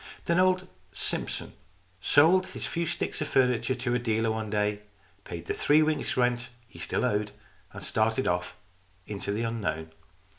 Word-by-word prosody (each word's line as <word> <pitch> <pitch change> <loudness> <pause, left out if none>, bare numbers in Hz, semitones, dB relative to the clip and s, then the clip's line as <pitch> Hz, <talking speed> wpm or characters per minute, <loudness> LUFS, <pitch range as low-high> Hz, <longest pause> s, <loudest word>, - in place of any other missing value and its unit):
Then 170 +1 +2
old 185 0 +3 0.3
Simpson - - -2 0.5
sold 165 - +5
his - - -6
few 170 -1 -1
sticks - - -2
of 155 - -1
furniture 125 -2 +2
to 125 -1 -1
a 125 - +2
dealer 115 -1 +1
one 110 -1 -3
day, 105 0 0 0.5
paid 85 -1 -6
the - - -1
three 150 +2 +4
weeks' 155 -4 -1
rent 125 -1 +1 0.2
he - - -14
still - - -1
owed, 105 -3 0 0.4
and - - -9
started 110 +4 +1
off 90 0 -1 0.5
into 100 -1 -4
the 110 +3 -1
unknown. 80 -9 -2
120 Hz, 160 wpm, -28 LUFS, 105-145 Hz, 0.5 s, sold